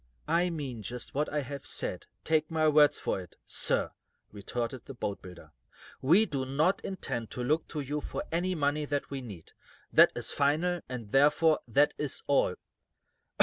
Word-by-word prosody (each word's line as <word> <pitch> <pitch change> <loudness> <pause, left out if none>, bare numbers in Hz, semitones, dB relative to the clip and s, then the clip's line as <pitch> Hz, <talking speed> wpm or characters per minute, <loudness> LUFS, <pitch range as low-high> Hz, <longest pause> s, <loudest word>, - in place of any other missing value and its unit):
"I 175 +2 +2
mean 140 -9 -5
just 120 +5 -5
what 150 +2 -1
I 150 0 0
have 140 +1 -7
said, - - -2 0.2
take 155 -1 +1
my 160 -1 +2
word 150 -1 +6
for 95 - -2
it, 90 - -14
sir," - - +2 0.4
retorted 115 +4 -4
the 135 - -9
boatbuilder. 90 -7 -6 0.5
"We 175 +11 +5
do 140 -8 -3
not 150 +8 +1
intend 120 - -4
to 125 - -5
look 155 +6 +1
to 150 - -4
you 145 +2 -3
for - - -5
any 180 +3 0
money 150 0 0
that 145 -1 -3
we 135 -1 -4
need. 100 -10 -10 0.4
That - - +7
is - - +1
final, 160 +5 +1
and, 115 -5 -6
therefore, 150 +3 +4
that 145 +5 +3
is 150 -3 -2
all." 135 -10 +2
145 Hz, 170 wpm, -30 LUFS, 125-155 Hz, 0.5 s, That